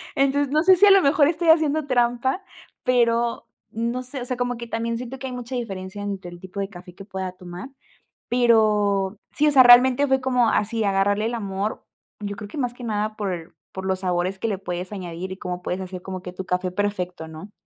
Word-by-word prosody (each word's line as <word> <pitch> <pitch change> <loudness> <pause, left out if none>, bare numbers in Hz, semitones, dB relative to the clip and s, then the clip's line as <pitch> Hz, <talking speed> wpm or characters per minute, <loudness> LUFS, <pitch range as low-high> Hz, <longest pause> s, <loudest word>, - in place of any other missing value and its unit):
entonces 275 0 +2
no 310 - +4
sé 375 +1 +7
si 410 - +7
a - - +8
lo 390 -1 +7
mejor 285 0 +4
estoy 340 0 0
haciendo 310 -2 +4
trampa, 245 +7 +1 0.4
pero 235 -1 +1 0.2
no 235 +3 -2
sé, 255 +1 -7
o - - -4
sea, 250 0 -3
como 245 0 -1
que 235 0 -7
también 230 +1 -2
siento 250 +2 -6
que 265 - -6
hay 255 - -6
mucha 250 +1 -6
diferencia 200 -3 -5
entre 195 -3 -5
el 175 - -11
tipo 190 +2 -8
de 195 - -2
café 180 -2 -12
que 195 - -11
pueda 190 -2 -4
tomar, 180 +7 -9 0.6
pero 210 -4 +3
sí, 300 - +2
o 295 - +4
sea, 265 -2 +7
realmente 250 +3 +7
fue 265 0 +2
como 250 -3 +2
así 220 +1 0
agarrarle 200 +1 +1
el 235 +1 -1
amor, 200 -1 -3 0.3
yo 205 -1 -4
creo 210 - -7
que 300 - -9
más 245 -3 -1
que 245 - -11
nada 215 -1 -2
por 180 -5 -4 0.2
por 190 0 -6
los 190 -1 0
sabores 180 +1 -1
que - - -1
le 200 -3 -1
puedes 180 -1 -5
añadir 180 -1 -6
y - - -10
cómo 180 -1 -5
puedes 180 +1 -3
hacer 185 -1 -7
como 185 -1 -6
que 180 - -7
tu 185 0 -6
café 180 0 -1
perfecto, 180 -4 -3
¿no? 160 +6 -10
215 Hz, 225 wpm, -23 LUFS, 190-250 Hz, 0.6 s, a